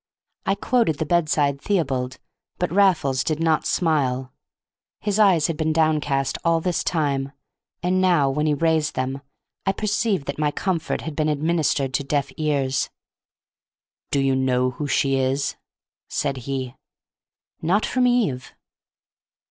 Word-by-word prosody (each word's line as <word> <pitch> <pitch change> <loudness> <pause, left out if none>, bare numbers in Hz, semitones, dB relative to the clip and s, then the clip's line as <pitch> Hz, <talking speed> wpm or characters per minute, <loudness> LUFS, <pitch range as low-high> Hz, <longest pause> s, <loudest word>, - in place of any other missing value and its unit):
I 195 - +3
quoted 225 - +1
the 160 - -1
bedside 150 -4 +1
Theobald, 135 -10 -1 0.4
but 180 - -1
Raffles 170 -9 +3
did 155 +1 -1
not 160 -1 +1
smile. 135 -6 0 0.7
His 205 0 -1
eyes 185 -8 +5
had 165 - 0
been 155 0 0
downcast 150 -4 +1
all 165 -1 +3
this 175 +1 -1
time, 140 -5 0 0.5
and 185 +1 +2
now, 175 -7 +4
when 150 +3 0
he 150 - +2
raised 160 0 +1
them, 130 +2 -2 0.5
I 195 - +3
perceived 210 -5 0
that 140 +2 -5
my 150 -1 +2
comfort 170 +1 -2
had 160 -2 -6
been 155 0 +1
administered 150 -3 0
to 140 - 0
deaf 140 0 -1
ears. 140 -4 0 1.2
"Do 140 - +1
you 135 -1 +2
know 130 -1 +1
who 145 +3 -4
she 135 -1 +2
is?" 135 +2 0 0.5
said 140 - -1
he. 130 -2 -3 0.9
"Not 190 +6 +2
from 250 -1 +2
Eve." 210 - 0
150 Hz, 140 wpm, -23 LUFS, 135-170 Hz, 1.2 s, eyes